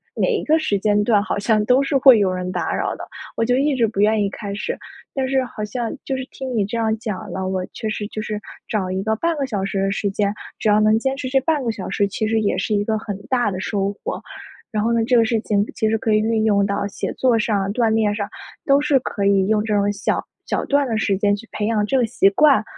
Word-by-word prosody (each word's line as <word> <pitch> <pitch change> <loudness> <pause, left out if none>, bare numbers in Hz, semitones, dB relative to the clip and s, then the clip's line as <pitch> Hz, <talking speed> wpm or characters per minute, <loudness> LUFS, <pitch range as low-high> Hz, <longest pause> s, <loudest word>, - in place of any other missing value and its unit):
每 - - +1
一 435 - -1
个 315 +1 +3
时 210 -10 0
间 210 +1 +2
段 205 -2 +3
好 205 - -2
像 215 +1 +2
都 250 +4 +4
是 275 +1 -1
会 260 -4 +7
有 200 -2 +2
人 180 0 -3
打 175 -3 -2
扰 - - -1
的， - - -9 0.3
我 230 - +2
就 245 +1 +2
一 285 +3 +2
直 235 -3 +2
不 210 -2 -5
愿 215 +1 +3
意 200 - +1
开 200 0 -6
始。 200 - -3 0.4
但 265 -1 -1
是 265 0 +1
好 215 -3 -7
像 230 +2 -3
就 270 - -2
是 260 0 -5
听 260 -2 -6
你 210 -3 +2
这 220 +4 -4
样 220 -1 +1
讲 215 -3 -5
了， 190 +1 -3
我 185 -1 -2
确 220 - -4
实 210 0 -3
就 215 - -5
是， 215 -1 -4 0.3
找 190 -4 -1
一 190 +1 -1
个 220 +1 +1
半 335 +8 0
个 280 - 0
小 205 -6 -2
时 195 0 -2
的 195 0 +1
时 200 +1 -1
间， 200 0 0 0.3
只 - - -1
要 210 0 +5
能 215 +1 +4
坚 265 +3 -1
持 270 - -4
这 270 +1 +3
半 295 +1 0
个 235 - 0
小 200 -4 -6
时， 200 - +1
其 215 +2 -2
实 225 0 +1
也 205 - 0
是 215 - -1
一 205 - +1
个 220 +1 0
很 205 -2 -5
大 245 -4 +1
的 185 -2 -4
收 200 0 -1
获。 - - -4 0.5
然 210 -1 -1
后 230 - +1
呢， 230 - +2
这 250 - +2
个 230 - +5
事 230 -1 +1
情 205 -2 +1
其 220 - 0
实 225 - +2
可 220 0 0
以 - - +5
运 220 0 +1
用 205 -2 +3
到 200 0 -1
写 200 - -4
作 245 -3 +2
上、 200 -3 0
锻 230 0 +2
炼 220 -1 +2
上， 205 -1 -3 0.4
都 275 0 +5
是 290 -2 +3
可 205 -5 -3
以 195 -1 +3
用 210 0 +2
这 215 -1 -1
种 205 0 +2
小 205 +1 -1 0.2
小 - - -1
段 285 0 +2
的 225 -3 -1
时 200 -3 +1
间 205 +1 +2
去 220 +3 -11
培 210 - -2
养 215 -1 +1
这 265 - +1
个 250 - +3
习 215 -3 +3
惯， 270 +2 +4
215 Hz, 300 characters per minute, -21 LUFS, 205-240 Hz, 0.5 s, 会